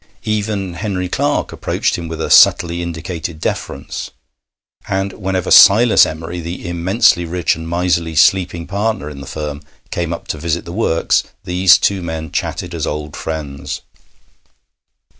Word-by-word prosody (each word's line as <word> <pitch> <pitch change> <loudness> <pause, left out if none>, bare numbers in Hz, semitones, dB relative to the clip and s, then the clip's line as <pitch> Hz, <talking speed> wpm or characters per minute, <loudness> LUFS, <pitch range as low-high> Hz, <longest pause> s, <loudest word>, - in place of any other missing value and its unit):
Even 105 -3 -2
Henry 95 -1 -3
Clarke - - -1
approached - - -1
him 85 -1 -5
with 80 -1 -6
a - - -2
subtly 85 0 +5
indicated 85 -1 -5
deference, - - -4 0.8
and 95 0 -1
whenever 95 -2 -2
Silas 115 +3 +7
Emery, 85 +2 -6
the 85 +1 -6
immensely 85 +2 +2
rich 85 0 0
and 80 0 -7
miserly 85 -2 0
sleeping 85 +1 +3
partner 100 -4 -2
in 70 -2 -9
the 70 - -9
firm, 75 0 -5 0.3
came 85 -1 -2
up 85 - -6
to 75 - -3
visit 85 +1 -2
the 85 - -7
works, 90 -5 +1 0.2
these 90 0 +5
two 100 - +1
old 90 - -6
men 80 -1 -5
chatted 90 -1 -3
as 80 -3 -3
old 75 0 -4
friends. 75 -3 -5
85 Hz, 150 wpm, -17 LUFS, 80-95 Hz, 0.8 s, Silas